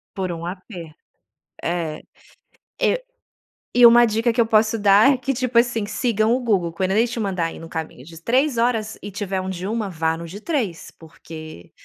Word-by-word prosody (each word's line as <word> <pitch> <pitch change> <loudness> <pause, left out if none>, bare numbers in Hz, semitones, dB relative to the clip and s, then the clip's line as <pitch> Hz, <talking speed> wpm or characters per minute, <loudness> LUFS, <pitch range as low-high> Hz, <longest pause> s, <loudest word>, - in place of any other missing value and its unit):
Por 190 -2 -2
um 170 0 -6
aper 180 -3 -8 0.7
É. 165 -3 -2 0.8
E - - +1 0.7
e 245 -1 +8
uma 240 +1 +7
dica 230 +1 +1
que 240 - +2
eu - - +5
posso 220 0 +2
dar 205 +6 +5
é - - -1
que, 265 +2 -2
tipo 255 -2 -3
assim, 235 -3 +3
sigam 220 0 +1
o 255 - 0
Google. 190 -9 0
Quando 185 +1 -1
ele 220 +5 +3
te 235 - -5
mandar 185 -6 -2
ir - - -10
num 165 0 -11
caminho 160 -6 -6
de 165 +1 -12
3 255 - +1
horas 225 -2 0
e 205 - -6
tiver 195 -1 -3
um 185 - -5
de 185 0 -5
1, 215 0 -2
vá 160 -2 -1
no 170 +1 -7
de 195 +6 -10
3, 230 - -3
porque 155 - -11
205 Hz, 200 wpm, -22 LUFS, 170-235 Hz, 0.8 s, e